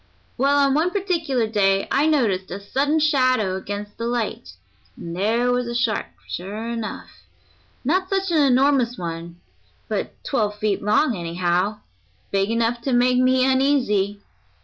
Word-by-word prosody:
Well, 280 +3 +2
on 280 -1 +3
one 315 +5 +2
particular 335 - 0
day 195 -3 +1
I 285 +3 +3
noticed 215 -12 +1
a 190 - -5
sudden 275 +9 0
shadow 255 -10 +2
against 205 +2 -6
the 230 - -2
light, 235 -2 -3 0.4
and 170 0 -7
there 230 +6 +1
was 245 -1 0
a 235 - -4
shark 235 -3 0 0.2
sure 205 +5 -5
enough; 230 -2 -7 0.6
not 370 +6 +1
such 385 -2 0
an 320 -3 +3
enormous 260 -2 +3
one, 170 0 -6 0.5
but - - -3
twelve 210 -6 -1
feet 210 -2 -1
long 220 +5 +2
anyhow 175 +4 -1 0.5
big 195 +1 +1
enough 230 +1 0
to 265 +2 -1
make 250 +1 +3
me 255 0 +3
uneasy. 255 -7 +1
235 Hz, 150 wpm, -22 LUFS, 200-275 Hz, 0.6 s, on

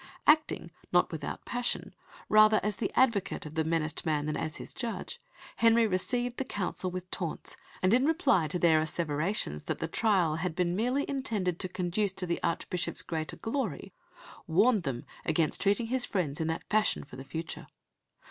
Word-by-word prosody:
Acting, 300 - +3 0.2
not 175 0 +3
without 155 -3 -5
passion, 245 0 -2 0.3
rather 215 0 +6
as 210 0 -1
the 205 - -2
advocate 230 -11 +2
of 150 - -8
the 160 0 +1
menaced 160 -1 -1
man 150 -3 0
than 150 - -1
as 155 - -3
his - - -9
judge, 235 -3 -5 0.4
Henry 230 0 +5
received 240 +5 0
the - - 0
Council 190 -5 -3
with 180 0 -6
taunts, 170 -4 -4 0.3
and 185 +3 +4
in 255 +3 +4
reply 320 - +3
to 180 - -2
their 165 -3 +5
asseverations 155 - -1
that - - -2
the 165 - -2
trial 175 -4 +2
had 165 0 -2
been 175 -1 +1
merely 250 +7 0
intended 215 -11 -1
to 185 - -1
conduce 185 +3 0
to 185 - -2
the 170 -1 -2
Archbishop's 170 +1 -1
greater 160 -2 -3
glory, 225 - -3 0.5
warned 205 +6 +4
them 135 -7 -4 0.2
against 160 -1 0
treating 205 +4 +2
his 250 +2 0
friends 165 -10 -1
in 160 - 0
that 160 0 -3
fashion 215 0 +2
for 140 - -12
the 135 - -7
future. 160 +4 -6
180 Hz, 175 wpm, -30 LUFS, 160-225 Hz, 0.5 s, rather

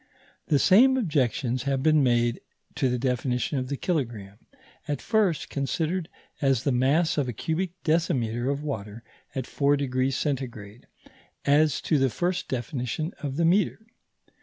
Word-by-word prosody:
The 150 - +3
same 245 - +5
objections 130 - 0
have 135 -1 0
been 155 -1 +4
made 120 -2 +2 0.3
to 130 - 0
the 125 - 0
definition 125 +3 -1
of 130 - -4
the 140 +1 -3
kilogramme, 115 - -3 0.5
at 145 -3 -2
first 210 -8 0
considered 160 +5 -2 0.3
as 135 -4 +2
the 140 - +1
mass 140 +6 +2
of 140 - 0
a 125 - -3
cubic 165 - -2
decimetre 130 -7 0
of 140 +1 -3
water 110 -5 -5 0.3
at 130 - -1
4° 145 +2 +1 0.3
C., 125 -6 -4 0.6
as 145 0 +3
to 155 - +1
the 135 0 +3
first 180 +8 -2
definition 130 - -3
of 140 -2 -4
the 165 +2 +1
metre. 200 +5 +2
140 Hz, 145 wpm, -26 LUFS, 125-160 Hz, 0.6 s, same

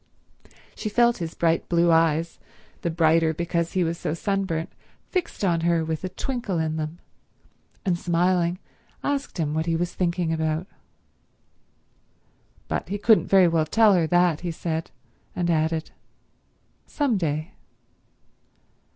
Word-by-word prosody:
She 215 - -4
felt 240 +2 +3
his 165 -2 -5
bright 165 -1 +1
blue 170 0 +3
eyes, 165 0 +2 0.4
the 170 - -1
brighter 160 -1 +3
because 170 0 -1
he 185 - +2
was 165 0 -2
so 155 - -2
sunburnt, 190 -3 -2 0.4
fixed 360 - -2
on 170 -3 +1
her 165 -1 +1
with 160 +1 -3
a 185 - -2
twinkle 230 -1 -3
in 160 -1 -1
them, 155 +1 -4 0.9
and 175 -3 +1
smiling 175 0 +1 0.5
asked 285 -5 -2
him 155 -3 -1
what 160 +1 -1
he 165 - +1
was 175 +1 -2
thinking 175 -2 0
about. 160 +1 -1 2.0
But - - -3
he 205 - -2
couldn't 215 +1 +4
very 190 -2 +6
well 165 -2 +1
tell 220 +4 +5
her 170 -3 +2
that, 175 -2 +3
he 175 - -4
said; 160 -1 -3 0.5
and 175 -1 0
added, 160 0 0 1.0
"Some 280 -6 0
day." 155 -1 -2
170 Hz, 140 wpm, -24 LUFS, 160-185 Hz, 2.0 s, very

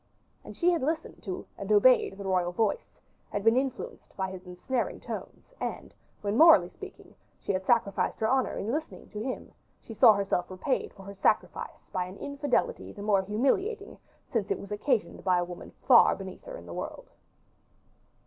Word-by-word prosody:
And - - -11
she 355 0 +4
had 340 - 0
listened 315 +4 -2
to 185 -3 -4
and 200 +1 -4
obeyed 210 -1 +5
the 200 - -7
royal 180 -2 +1
voice, 210 +3 -1 0.3
had 205 - -3
been 225 +1 +5
influenced 260 -1 -3
by 190 -1 -2
his 185 -1 -10
ensnaring 205 +8 -2
tones; - - -8
and - - -5 0.3
when, 205 0 -1
morally 325 0 +8
speaking, - - -12 0.3
she - - -2
had 185 -1 -1
sacrificed 230 -5 +1
her 220 - +1
honor 260 +2 +1
in 215 - -2
listening 310 +4 -5
to 210 - -6
him, 255 +3 -5 0.3
she 225 - -10
saw 220 0 +7
herself 200 -3 -1
repaid 190 +9 -2
for 195 - -13
her 200 +1 -8
sacrifice 195 - -1
by 180 -1 0
an 185 +2 -10
infidelity 280 0 -1
the 200 - -9
more 205 -2 +3
humiliating, 280 - 0 0.4
since 225 -5 0
it - - 0
was 200 - -10
occasioned 220 +2 -1
by 185 -2 +3
a 175 - +1
woman 175 0 -9 0.2
far - - +7
beneath - - -9
her - - -7
in - - -12
the - - -8
world. - - -6
215 Hz, 185 wpm, -29 LUFS, 195-265 Hz, 0.4 s, morally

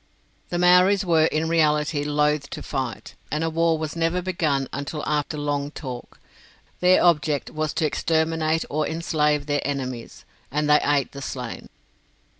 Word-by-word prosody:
The 175 - -2
Maoris 180 +3 +5
were 165 -3 +4
in 160 0 0
reality 150 -2 +2
loath 150 -1 +1
to - - -7
fight, 130 -5 -4 0.2
and 155 +3 -1
war 165 0 +2
was 155 0 -4
never 165 +2 0
begun 160 -7 -1
until 145 +2 -4
after 150 0 -1
long 145 -1 -2
talk. 130 -5 -8 0.6
Their 180 +1 +4
object 155 -4 +2
was 155 -1 -2
to 160 - 0
exterminate 160 +1 0
or 155 +1 -1
enslave 150 -3 0
their 145 -1 0
enemies, 130 -4 -5 0.2
and 150 +2 -1
they 150 0 +5
ate 145 -2 +1
the 140 - -9
slain. 125 -3 -6
150 Hz, 150 wpm, -24 LUFS, 145-165 Hz, 0.6 s, Maoris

